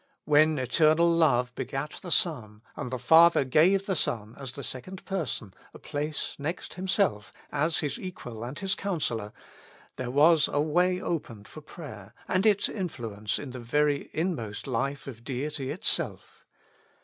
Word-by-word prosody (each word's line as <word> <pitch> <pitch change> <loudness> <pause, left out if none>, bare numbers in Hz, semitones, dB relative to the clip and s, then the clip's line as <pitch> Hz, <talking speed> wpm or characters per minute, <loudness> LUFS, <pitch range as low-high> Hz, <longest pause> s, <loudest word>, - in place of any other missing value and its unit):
When 155 +1 +4
eternal 155 +6 +4
Love 125 -7 +3
begat 135 +4 -4
the 180 - -7
Son, 115 - +1
and - - -5
the 130 - -3
Father 160 +4 +6
gave 180 +9 +4
the 190 - 0
Son 110 -7 -1
as 135 -3 -7
the 140 - -7
Second 180 - -7
Per 190 -6 -2
son, 100 -5 -5 0.2
a - - -7
place 145 +1 -4
next 160 +5 -4
Himself 185 - 0 0.2
as 155 +3 +1
His 145 -2 -3
Equal 120 - -7
and 125 +4 -6
His 195 -1 0
Counsellor, 120 - -2 0.7
there 125 -1 -3
was 150 +3 +5
a 145 - +1
way 180 +5 +2
opened 120 - -4
for 155 - -11
prayer 125 - -10
and 185 +4 +2
its 205 -2 +4
influence 115 - -3
in 140 - -6
the 125 - -7
very 145 +4 0
inmost 130 - -3
life 135 +2 -2
of 115 -4 -9
Deity 135 +1 -3
itself. 170 +9 -2
145 Hz, 160 wpm, -28 LUFS, 125-170 Hz, 0.7 s, Father